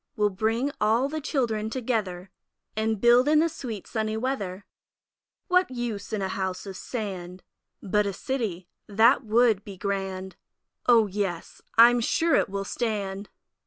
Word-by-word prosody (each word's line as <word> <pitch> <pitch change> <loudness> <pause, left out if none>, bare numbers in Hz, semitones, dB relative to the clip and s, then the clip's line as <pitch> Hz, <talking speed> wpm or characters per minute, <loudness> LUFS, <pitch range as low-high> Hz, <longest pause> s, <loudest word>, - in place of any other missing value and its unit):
We'll 210 -1 +2
bring 225 +8 0
all 235 +6 +3
the 310 +1 -4
Children 230 -7 -1
together 210 -7 -3 0.4
And 220 -1 0
build 240 +4 +5
in 305 +1 +5
the 320 +2 +4
sweet 230 - -6
sunny 220 -1 -2
weather. 205 -6 -3 0.8
What 365 0 +3
use 240 -5 -4
in 210 -3 -2
a - - 0
House 190 0 -3
of 195 -1 -7
Sand? 185 -5 -6 0.4
But 210 +1 +1
a - - -1
City 205 -8 -3 0.2
that 220 +4 +4
would 220 -2 +3
be 200 -3 -9
grand! 190 -1 -4 0.5
O 235 -3 +6
yes, 190 -4 -4 0.2
I 235 +1 +9
am 245 - +1
sure 325 +8 +1
it - - +3
will 195 0 -3
stand! 200 -3 -3
215 Hz, 155 wpm, -26 LUFS, 195-240 Hz, 0.8 s, I